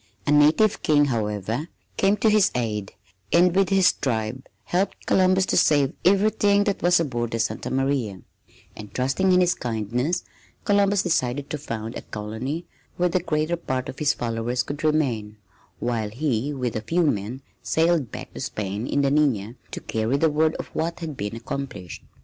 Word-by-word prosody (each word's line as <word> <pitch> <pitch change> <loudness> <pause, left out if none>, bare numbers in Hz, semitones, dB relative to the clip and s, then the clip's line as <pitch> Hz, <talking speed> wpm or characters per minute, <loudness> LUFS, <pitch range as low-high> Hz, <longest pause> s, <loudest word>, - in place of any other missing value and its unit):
A - - +1
native 155 +9 +4
king, 145 -1 +4
however, 110 - -2 0.3
came 195 +2 +2
to 220 +2 +3
his 210 -2 +5
aid 105 -5 -2 0.4
and 175 +1 +4
with 195 0 +3
his 195 -2 +5
tribe 115 0 -3 0.2
helped 185 +3 -1
Columbus 185 0 +3
to - - 0
save 145 -4 +3
everything 200 +1 +3
that 200 -1 -1
was 175 0 +4
aboard 120 -7 -1
the 115 - -2
Santa 110 - -2
Maria, 130 -7 -1 0.6
and 105 -2 -10
trusting 135 +9 +1
in 180 0 +5
his 180 -1 +3
kindness 120 - -2 0.4
Columbus 200 -1 +3
decided 140 -5 -1
to 150 - -3
found 115 -5 -5
a - - -5
colony 110 +10 -5 0.3
where 180 0 +2
the 185 - +1
greater 155 0 0
part 130 -6 -3
of - - -8
his 150 -2 +3
followers 120 +1 -2
could 145 +2 -6
remain, 125 -9 0 0.4
while 115 -3 -2
he 130 +2 -1
with 125 -4 -3
a 110 - -1
few 170 +10 +1
men 125 -1 -1 0.2
sailed 160 -6 +1
back - - -8
to - - -8
Spain 105 +3 -3
in 140 - +1
the 135 - +2
Nina 125 -8 +1 0.2
to - - -6
carry 110 +4 -1
the 160 +1 +2
word 155 +1 +2
of - - -6
what 165 +2 -2
had 160 -3 -5
been 105 -1 -4
accomplished. 115 - -6
140 Hz, 175 wpm, -24 LUFS, 115-170 Hz, 0.6 s, his